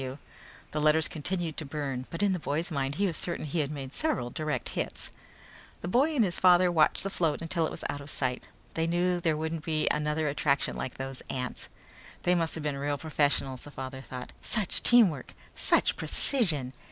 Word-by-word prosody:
F.W. 130 +1 -5 0.5
The 150 - -1
letters 155 +1 +4
continued 170 0 -3
to - - -1
burn, 135 -3 -4
but 170 +5 -3
in 200 -2 +3
the 180 - -1
boy's 160 +4 -2
mind 140 -2 -1
he 200 - +1
was 175 -4 -1
certain 170 -2 -2
he 155 +3 -2
had 145 -2 0
made 140 -2 -6
several 305 - 0
direct 155 +1 -2
hits. - - -4 0.7
The - - -4
boy 275 - +3
and 235 -6 +4
his 175 - -2
father 180 -1 +6
watched 160 -3 +3
the 195 - -2
float 160 -6 +1
until 165 -1 0
it - - -4
was - - -6
out 145 - -4
of 140 - -10
sight. 125 -3 -2 0.3
They 165 0 0
knew 175 +1 +1
there 160 -2 +1
wouldn't 160 0 -3
be 155 -1 0
another 150 +1 0
attraction 140 -1 +1
like 130 - -4
those 135 0 -5
ants. 125 -1 -4 0.5
They 180 - +4
must 165 -2 +1
have 160 - -5
been 145 -2 -1
real 145 +1 -1
professionals, 145 -3 0
the - - -9
father 130 -1 -6
thought. 125 -1 -8
Such 215 -5 -1
teamwork! 200 - +4 0.2
Such - - +3
precision! 155 - +2
155 Hz, 200 wpm, -29 LUFS, 140-175 Hz, 0.7 s, father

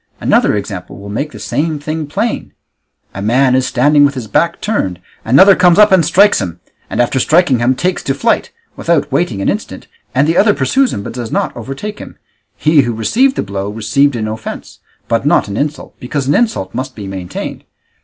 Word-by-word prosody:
Another - - +2
example 100 -3 -6
will 100 +1 -10
make 140 +9 -3
the - - -11
same 155 +1 -2
thing 155 +1 -4
plain: 210 +10 -3 0.6
a 100 - -6
man 125 +5 +2
is 130 0 +2
standing 145 +3 +3
with 140 -1 +2
his 125 -3 -5
back 170 +10 0
turned, 95 - -2 0.2
another 140 - +6
comes 180 -2 +4
up 210 0 +6
and 185 -3 +5
strikes 190 - +4
him, 90 -3 -5 0.3
and - - -4
after 120 +2 +1
striking 155 -3 +3
him 125 +2 +2
takes 180 +6 -1
to 135 - -2
flight, - - 0 0.3
without 165 -4 0
waiting 130 - -1
an - - -1
instant, - - -3 0.3
and 140 +3 +3
the 165 - +1
other 205 0 +4
pursues 255 - +1
him 100 - -4
but - - -7
does 120 -2 -6
not - - -1
overtake 135 - -6
him; - - -11 0.4
he 155 -1 +3
who 120 -2 -2
received 245 - +2
the - - -1
blow 100 0 -4
received 125 +6 +1
an 110 -2 -2
offence, 110 +1 -7 0.3
but - - 0
not - - +2
an 100 - -5
insult, 150 +5 -3
because 130 +2 -3
an 145 - +3
insult 150 - 0
must 130 0 -5
be 105 - -7
maintained. 95 -2 -6
135 Hz, 205 wpm, -14 LUFS, 110-165 Hz, 0.6 s, another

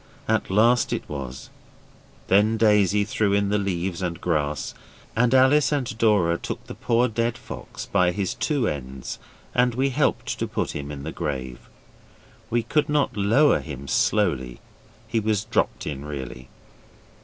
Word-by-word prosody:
At - - +1
last 115 +5 +3
it - - -4
was; 65 -2 -7 0.8
then 105 +4 +4
Daisy 105 -2 +4
threw 105 -1 0
in 100 0 +2
the 105 +1 +2
leaves 95 -2 -2
and 85 -2 -3
grass, 75 -5 -1 0.4
and 120 +1 +3
Alice 130 +3 +5
and 130 -4 -1
Dora 95 -7 +3
took - - -5
the - - -8
poor 120 +1 +1
dead 115 +1 -1
fox - - -8
by 90 -3 +2
his 95 0 -2
two 140 -7 0
ends 65 -2 -5 0.3
and 125 -1 +2
we 135 +2 +2
helped 140 +3 0
to - - -1
put - - -2
him 70 0 -5
in 70 -1 -7
the 80 - -4
grave. 65 -7 -5 0.8
We 120 0 +1
could 150 +6 +1
not 145 -2 +1
lower 110 +9 +4
him 70 -3 -8
slowly 70 - +1 0.5
he 115 0 0
was 110 -1 0
dropped - - 0
in, 70 -2 -4
really. 65 -4 -7
100 Hz, 155 wpm, -24 LUFS, 75-115 Hz, 0.8 s, Alice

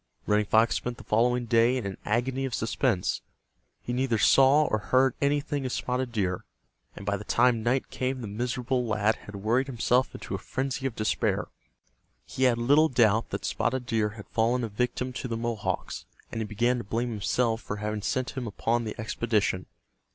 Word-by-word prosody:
Running 105 0 +2
Fox 110 +2 +4
spent 120 -1 -4
the - - -11
following 120 +3 +2
day 115 +2 +3
in 120 - -3
an 95 -1 -4
agony 125 +5 0
of 130 - -2
suspense. 115 -3 0 0.6
He 120 - -3
neither 125 -2 +1
saw 135 +6 +6
or 110 -7 0
heard 130 +4 +3
anything 145 0 0
of 130 - -3
Spotted 125 0 -2
Deer, 95 -5 -1 0.5
and 100 - -9
by 100 0 0
the 105 - -8
time 120 +1 +3
night 125 +4 0
came 130 0 -2
the 115 - -5
miserable 125 +4 -1
lad 110 -1 +1
had 105 - -11
worried 115 +7 +1
himself 125 0 +1
into - - -7
a - - -2
frenzy 135 0 -2
of 120 - -6
despair. 110 0 0 0.8
He 130 - 0
had 120 -2 +4
little 145 +7 +4
doubt 115 -3 +3
that - - -4
Spotted 130 -1 -1
Deer 110 -3 +1
had 105 - -9
fallen 120 +2 +1
a 115 - -2
victim 125 +4 -2
to 125 - -4
the 115 -2 -3
Mohawks, 115 -3 -3 0.2
and 115 - -3
he - - -1
began 120 +4 +1
to - - -5
blame 115 +5 -2
himself 115 +2 0
for 105 - -5
having 105 0 -3
sent 130 +5 -1
him 130 -3 -5
upon 115 +3 -1
the 110 - -6
expedition. 110 -4 0
120 Hz, 190 wpm, -27 LUFS, 110-130 Hz, 0.8 s, saw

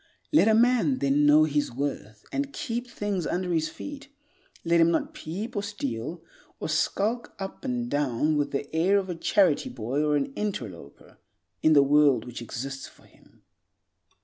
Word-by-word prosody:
"Let 295 - +6
a 220 - +5
man 250 +3 +3
then 140 +1 +2
know 150 +1 +7
his 150 -1 0
worth, 120 -5 -5
and 280 0 -2
keep 240 -1 -4
things 205 -6 -2
under 180 0 -1
his 160 -1 +1
feet. 290 -2 -9 0.6
Let 170 0 +4
him 165 - +5
not 170 - -1
peep 205 +10 -6
or 205 - 0
steal, 165 - -5 0.4
or - - -4
skulk 215 +9 -1
up 195 -1 -7
and 245 -2 -2
down 145 - 0
with 145 -1 0
the 140 +2 -4
air 185 +5 +3
of 190 -2 -1
a - - -4
charity 175 -2 +2
boy 125 +4 -2
or 150 -1 +2
an 140 -1 -1
interloper, 110 - -6 0.4
in 155 - +5
the 140 -2 +7
world 140 -4 +4
which 125 -1 -7
exists 135 +4 -6
for - - -20
him." - - -24
155 Hz, 175 wpm, -27 LUFS, 140-205 Hz, 0.6 s, know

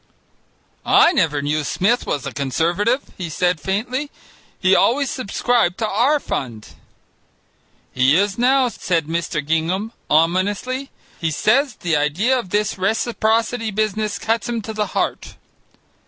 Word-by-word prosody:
"I - - +5
never 150 -5 +1
knew 150 +1 0
Smith 220 +11 0
was 140 - -2
a - - -4
Conservative," 175 - 0
he 175 -3 -4
said 175 +2 0
faintly; 245 - -2 0.5
"he 190 -1 +4
always 270 +3 +2
subscribed 230 -5 0
to 220 - -1
our 250 +9 +2
fund." 115 - -5 1.2
"He 130 +4 +3
is 200 0 +1
now," 255 +2 +3
said 170 -8 -1
Mr. 165 -2 -2
Gingham 170 +8 -1 0.2
ominously; 200 - +1 0.3
"he 165 - 0
says 240 - +1
the 170 -3 -1
idea 155 - +1
of 190 - -7
this 205 0 -1
reciprocity 225 +2 0
business 215 0 -1
cuts 225 +1 -1
him 230 -2 -2
to 220 - -6
the 210 -1 -1
heart." - - -2
205 Hz, 135 wpm, -20 LUFS, 165-235 Hz, 1.2 s, I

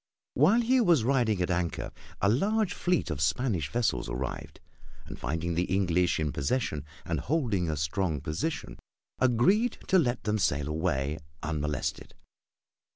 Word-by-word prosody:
While 185 - +4
he 250 +2 +3
was 170 - +4
riding 115 -7 +2
at 90 - -1
anchor 85 -1 -2 0.3
a - - +4
large 200 - +2
fleet 180 - 0
of 75 -2 -3
Spanish 80 - 0
vessels 115 - 0
arrived, - - -5 0.5
and - - -9
finding 80 +5 -2
the 85 +2 +1
English 90 -3 +1
in 75 -2 0
possession 75 - -1 0.2
and - - -1
holding 115 - 0
a 75 - -1
strong 75 +2 -1
position, 80 - -4 0.4
agreed 130 - +3
to 190 - +6
let 120 -6 0
them 105 0 0
sail 75 -7 +1
away 75 -2 -1 0.2
unmolested. 75 -2 -3
95 Hz, 145 wpm, -29 LUFS, -, 0.5 s, to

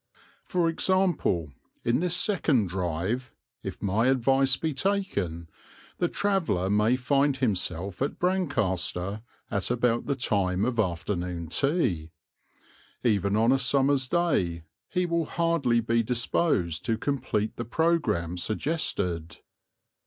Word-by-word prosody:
For 175 -3 +1
example, 165 - +1 0.3
in 120 +2 +2
this 175 0 +2
second 150 - +2
drive, 95 +8 -2 0.3
if - - -7
my 105 +5 +2
advice 135 +1 +3
be 160 -2 -2
taken, 130 - -1 0.5
the 175 - +2
traveller 165 - 0
may 105 +4 +3
find 135 +2 +1
himself 95 -5 -1
at 140 - -1
Brancaster 105 - -1 0.3
at 100 -4 0
about 120 -1 +1
the 140 - +1
time 100 -6 0
of 120 -2 -1
afternoon 90 -3 -2
tea. 100 - 0 0.9
Even 100 -4 +2
on 115 +3 +4
a 135 - +3
summer's 135 +1 +2
day 95 - 0 0.3
he 180 0 0
will 170 -1 0
hardly 160 -8 +1
be 115 +1 +1
disposed 115 - 0
to 115 - 0
complete 125 -5 -1
the 120 - -4
programme 115 - 0
suggested. 90 - -2
120 Hz, 120 wpm, -27 LUFS, 95-145 Hz, 0.9 s, on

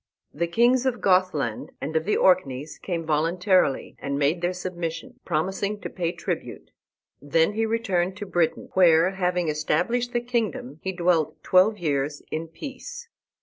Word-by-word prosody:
The 170 +3 -1
kings 240 +8 +3
of 250 -2 -1
Gothland 180 - +1
and 155 +4 -5
of 160 0 +1
the 210 - +1
Orkneys 150 -6 +1
came 170 -3 -3
voluntarily 165 +1 +1
and 140 0 -3
made 145 +4 +1
their 175 +1 +1
submission, 180 +5 -5
promising 190 +5 -1
to - - -6
pay 170 -2 -1
tribute. 170 - -5 0.5
Then 160 +6 +2
he 225 +1 0
returned 190 -5 0
to 205 - -5
Britain, 175 -4 0
where, 175 -1 +5
having 180 -2 0
established 160 +11 0
the 240 - 0
kingdom, 220 - -2
he 190 - -2
dwelt 170 -4 0
twelve 190 +4 +4
years 145 -4 -1
in 160 +1 -3
peace. 480 - -9
180 Hz, 150 wpm, -25 LUFS, 160-200 Hz, 0.5 s, where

